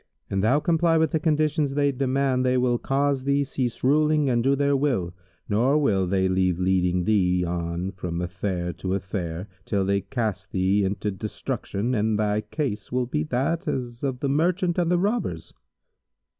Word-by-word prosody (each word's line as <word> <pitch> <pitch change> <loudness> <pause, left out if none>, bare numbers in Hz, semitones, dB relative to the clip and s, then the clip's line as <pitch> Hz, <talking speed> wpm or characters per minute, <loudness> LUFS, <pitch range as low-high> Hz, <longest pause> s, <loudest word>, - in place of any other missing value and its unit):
An 95 - 0
thou 125 +8 +3
comply 165 0 +2
with 160 -2 +2
the 160 - +1
conditions 155 -2 +1
they 145 -1 +2
demand, 135 -1 0
they 130 0 +2
will 125 -1 +2
cause 140 -1 0
thee 140 +1 +2
cease 130 -3 -3
ruling 150 +1 +3
and 120 -1 +1
do 135 +2 +3
their 140 0 +2
will; 125 -12 0 0.3
nor 120 +8 +2
will 100 -11 +2
they 95 0 +1
leave 95 -1 +1
leading 90 -1 +1
thee 90 -3 +2
on 85 +2 -3
from 90 -2 -5
affair 90 0 -3
to 95 0 -3
affair, 95 -2 -4 0.2
till 100 -2 0
they 100 +1 +1
cast 105 -7 -3
thee 95 +2 +2
into 100 +2 -1
destruction, 105 +3 -3
and 110 -1 +1
thy 105 0 +1
case 115 -6 -4
will 125 0 0
be 120 -10 -2
as 75 - -4
that 160 +8 -1
of 125 -1 -3
the 140 - 0
Merchant 175 +5 +1
and 170 -1 +1
the 180 - +3
Robbers." 210 +7 -2
120 Hz, 175 wpm, -25 LUFS, 95-140 Hz, 0.3 s, thou